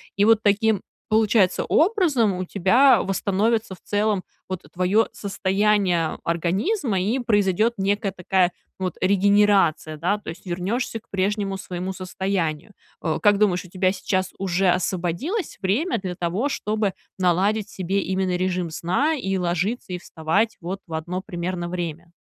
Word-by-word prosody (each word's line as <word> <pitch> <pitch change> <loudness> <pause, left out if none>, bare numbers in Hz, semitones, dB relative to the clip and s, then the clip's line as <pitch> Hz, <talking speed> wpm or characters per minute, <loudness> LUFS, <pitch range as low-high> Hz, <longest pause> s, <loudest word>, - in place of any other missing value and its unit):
И 200 - +3
вот 225 0 +5
таким, 210 0 +2 0.3
получается, 215 -3 +3
образом 315 - +2
у 185 0 -3
тебя 220 +6 +4
восстановится, 200 +3 0
в 180 - -12
целом, 205 -2 0 0.3
вот 185 -2 -4
твоё 185 +5 +2
состояние 195 -3 +1
организма. 195 - 0
И 215 +7 0
произойдет 215 -1 +2
некая 200 +1 0
такая 180 0 +2 0.3
вот 185 -3 -2
регенерация, 195 -5 +3
да. 180 +7 0
То - - -9
есть 170 - -9
вернешься 195 +7 -2
к - - -34
прежнему 195 0 -1
своему 185 0 -5
состоянию. 185 -1 -3 0.3
Э, 160 -2 -1
как 205 -2 +5
думаешь, 195 -4 +2
у - - -13
тебя 185 +1 +1
сейчас 185 -2 -1
уже 190 0 +1
освободилось 185 - -1
время 230 - +1
для 190 -3 -4
того, 180 +10 -1
чтобы 210 -6 -1 0.2
наладить 195 +4 +1
себе 190 +2 -1
именно 190 -1 -1
режим 180 -1 -1
сна 185 - 0
и 195 -9 -2
ложиться, 180 +4 -1
и - - -2
вставать 180 +6 -1
в 175 -1 -6
одно 175 +4 -3
примерно 175 -1 -4
время? 170 -1 -5
190 Hz, 145 wpm, -23 LUFS, 180-210 Hz, 0.3 s, вот